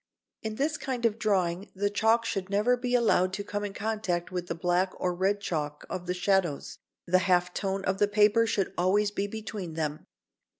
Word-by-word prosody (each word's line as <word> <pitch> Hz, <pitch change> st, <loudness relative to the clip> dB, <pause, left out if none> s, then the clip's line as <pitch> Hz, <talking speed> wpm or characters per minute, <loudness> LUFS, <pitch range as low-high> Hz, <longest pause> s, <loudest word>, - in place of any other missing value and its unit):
In 220 Hz, -1 st, -4 dB
this 295 Hz, +5 st, 0 dB
kind 250 Hz, -3 st, -2 dB
of 225 Hz, -1 st, +1 dB
drawing 190 Hz, -3 st, 0 dB
the 205 Hz, +1 st, 0 dB
chalk 225 Hz, +3 st, +3 dB
should 195 Hz, -3 st, -2 dB
never 210 Hz, +5 st, +3 dB
be 250 Hz, 0 st, -1 dB
allowed 190 Hz, -6 st, +3 dB
to 200 Hz, +1 st, -3 dB
come 205 Hz, 0 st, -4 dB
in 205 Hz, -, -3 dB
contact 210 Hz, -6 st, -2 dB
with 180 Hz, -1 st, -3 dB
the -, -, -3 dB
black 180 Hz, +2 st, +1 dB
or 180 Hz, -, 0 dB
red 195 Hz, +3 st, +1 dB
chalk 150 Hz, -6 st, -3 dB
of 180 Hz, -1 st, -4 dB
the 180 Hz, -, -1 dB
shadows, 180 Hz, -5 st, 0 dB, 0.3 s
the 185 Hz, +1 st, +4 dB
half 180 Hz, 0 st, +3 dB
tone 195 Hz, -1 st, -2 dB
of 190 Hz, +1 st, 0 dB
the 205 Hz, -, +4 dB
paper 210 Hz, +2 st, +4 dB
should 195 Hz, -3 st, 0 dB
always 200 Hz, +3 st, +3 dB
be 200 Hz, 0 st, -2 dB
between 205 Hz, -5 st, -6 dB
them. 155 Hz, -1 st, -3 dB
195 Hz, 200 wpm, -28 LUFS, 180-215 Hz, 0.3 s, the